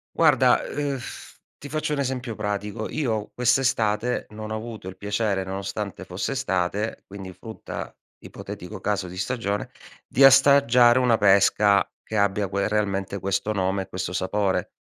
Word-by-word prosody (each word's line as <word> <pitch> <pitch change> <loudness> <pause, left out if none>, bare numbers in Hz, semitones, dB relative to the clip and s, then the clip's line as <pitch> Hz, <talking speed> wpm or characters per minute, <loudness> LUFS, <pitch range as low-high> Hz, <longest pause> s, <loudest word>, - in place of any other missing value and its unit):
Guarda, - - +4 1.0
ti 145 - -9
faccio 155 -1 -2
un 140 - -2
esempio 125 -4 -3
pratico: 105 +1 -3
io 115 -8 -2
quest'estate 125 -2 +1
non 110 0 -8
ho - - -1
avuto 110 -3 -7
il 95 0 -8
piacere 100 -1 -1
nonostante 95 +1 -5
fosse 95 +8 -4
estate, 105 -4 -2
quindi 95 -2 -9
frutta, 110 +2 -8 0.3
ipotetico - - -8
caso 100 -3 -1
di 90 +1 -9
stagione, 100 0 -2 0.4
di 135 - +3
assaggiare 135 -3 +6
una 120 -3 +3
pesca 100 0 +4 0.2
che 110 - -4
abbia 100 0 +1
quel 100 +2 -1
realmente 100 -2 -1
questo 100 +3 -1
nome 95 -1 0
e - - -16
questo 90 -1 -4
sapore. 95 +1 -1
105 Hz, 140 wpm, -24 LUFS, 95-120 Hz, 1.0 s, assaggiare